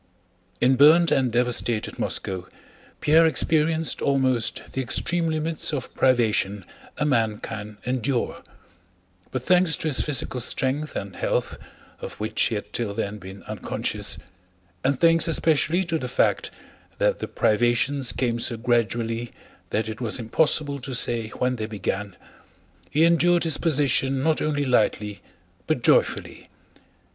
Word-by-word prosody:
In 130 +1 +3
burned 160 +4 +6
and 130 -3 +2
devastated 120 -2 0
Moscow 95 -2 -3 0.5
Pierre 160 +2 +5
experienced 160 0 +1
almost 130 -4 +1
the 135 - -1
extreme 165 +7 0
limits 155 0 -1
of 135 -5 -4
privation 105 -6 +1 0.3
a 150 - 0
man 115 -7 +1
can 105 -1 -7
endure; 125 0 -1 0.9
but 130 -2 -4
thanks 180 +1 +3
to 160 - -2
his 140 - +3
physical 135 -3 0
strength 135 +5 -1
and - - -5
health, - - -2 0.4
of - - -7
which - - -3
he - - +2
had - - -6
till 105 -4 -2
then 105 -1 -3
been 95 +1 -11
unconscious, - - -3 0.7
and 135 0 +1
thanks 165 0 +4
especially 165 +2 +2
to 165 -2 -2
the 125 - -5
fact - - +1 0.5
that - - +1
the - - -4
privations 120 +4 +1
came 120 -2 -1
so 115 0 0
gradually 115 0 -1 0.4
that 110 +1 -1
it 110 +2 -6
was 115 -3 +1
impossible 140 +4 +1
to 130 0 -5
say 115 -2 -1
when 125 +3 -2
they 110 -1 -3
began, 100 -2 -4 0.7
he 155 - +2
endured 170 +1 +3
his 160 -3 +1
position 135 -4 +1
not 160 -1 +1
only 145 -2 0
lightly 105 -4 0 0.5
but - - -1
joyfully. - - +1
130 Hz, 140 wpm, -24 LUFS, 115-155 Hz, 0.9 s, burned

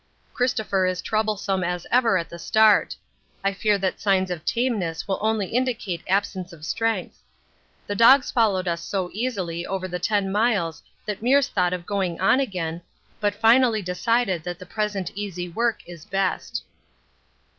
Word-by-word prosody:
Christopher 215 -6 +1
is 185 0 -1
troublesome 210 -3 -1
as 180 0 -2
ever 235 -5 +4
at 170 -3 -3
the 170 +1 -10
start; 215 +3 +4 0.5
I 195 0 +1
fear 205 +1 +1
that 190 -1 -2
signs 190 -2 +2
of 165 -3 -4
tameness 210 -10 -1
will 195 - -1
only 220 -1 +1
indicate 230 -8 -1
absence 190 -1 -1
of 155 -2 -11
strength. 225 0 -2 0.6
The 205 - -3
dogs 250 +6 +6
followed 200 -6 +2
us 170 -1 -1
so 185 -2 -3
easily 190 -8 -2
over 185 0 -3
the 180 -1 -4
10 200 0 0
miles 200 -6 +1 0.2
that 210 -1 -4
Meares 270 +3 +3
thought 180 -2 +1
of 180 -1 -4
going 190 -4 -2
on 195 +7 +4
again, 175 -9 -3 0.4
but 205 -1 0
finally 225 0 +4
decided 185 +1 0
that 175 0 -5
the 185 - -11
present 205 -2 -2
easy 190 -3 -4
work 230 +6 -1
is 170 -3 -10
best. 195 0 -2
195 Hz, 160 wpm, -24 LUFS, 180-220 Hz, 0.6 s, dogs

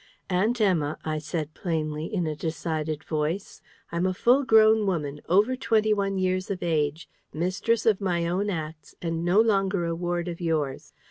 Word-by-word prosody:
"Aunt 215 +7 +1
Emma," 165 -8 +1
I 155 -1 -1
said 155 0 -4
plainly, 155 -2 -3
in 185 -6 0
a 155 -1 -2
decided 155 -1 -3
voice, 160 +5 -3 0.3
"I'm 170 +2 0
a 185 - -1
full 250 +8 +4
grown 220 -4 +5
woman, 150 -6 -2
over 205 +8 +4
twenty 220 -4 +2
one 195 -1 -1
years 185 0 0
of 190 -3 -3
age, 155 -1 0 0.2
mistress 185 +8 0
of 215 -3 +3
my 175 -3 0
own 185 +5 0
acts, 155 -4 -6
and 165 -1 -2
no 175 +4 +3
longer 195 -5 +2
a 170 - -1
ward 175 +1 -2
of 170 0 -5
yours. 155 -5 -2
175 Hz, 175 wpm, -26 LUFS, 155-200 Hz, 0.3 s, grown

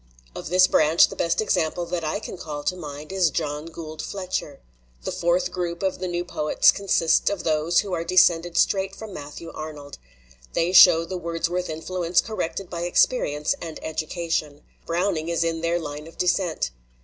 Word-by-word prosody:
Of - - -7
this 185 +1 +6
branch 155 -1 +4
the - - -8
best 170 +5 0
example 175 -4 0
that 170 0 -3
I 155 +6 -1
can 215 - -7
call 150 -4 -6
to 180 - 0
mind 150 -2 -8
is 185 -3 +3
John 150 -1 -3
Gould 160 -2 -8
Fletcher. 185 -7 -4 0.4
The - - -3
fourth 175 +1 +1
group 175 0 -3
of 190 -1 -1
the 185 - -3
new 175 0 -2
poets 155 -4 +3
consists 190 -5 +2
of 200 -3 -3
those 160 +2 +2
who 200 -3 -6
are 165 -1 -1
descended 175 -1 +3
straight 195 0 +2
from 215 -1 -9
Matthew 150 +2 -8
Arnold. 150 -2 -8 0.5
They 170 +2 +1
show 170 -3 +8
the 185 +2 -5
Wordsworth 170 +1 -2
influence 170 +2 0
corrected 195 -3 -3
by 170 -1 -5
experience 150 -5 +2
and 165 -2 -6
education. 160 -2 -3 0.2
Browning 170 -1 0
is 170 0 +1
in 165 -1 -1
their 170 +1 +1
line 150 -2 -6
of 165 - -15
descent. 175 - 0
170 Hz, 175 wpm, -24 LUFS, 155-180 Hz, 0.5 s, show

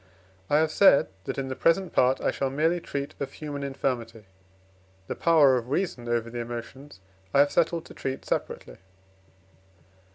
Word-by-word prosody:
I 145 - +4
have 155 0 +2
said, 195 -6 +5 0.2
that - - -4
in 135 -1 -3
the 130 - -4
present 175 +5 +1
part 130 +1 +3
I - - +1
shall 135 - -2
merely 160 +6 +1
treat 140 -4 -5
of 140 -1 -5
human 145 -2 -6
infirmity. 120 -5 -3 0.8
The - - -5
power 150 -6 +5
of 120 0 -5
reason 135 -7 -2
over 120 -1 0
the 120 - -5
emotions 120 +1 -8 0.3
I - - +6
have 145 - +2
settled 170 -1 +1
to - - -12
treat 135 0 -5
separately. - - -4
140 Hz, 165 wpm, -26 LUFS, 125-155 Hz, 0.8 s, I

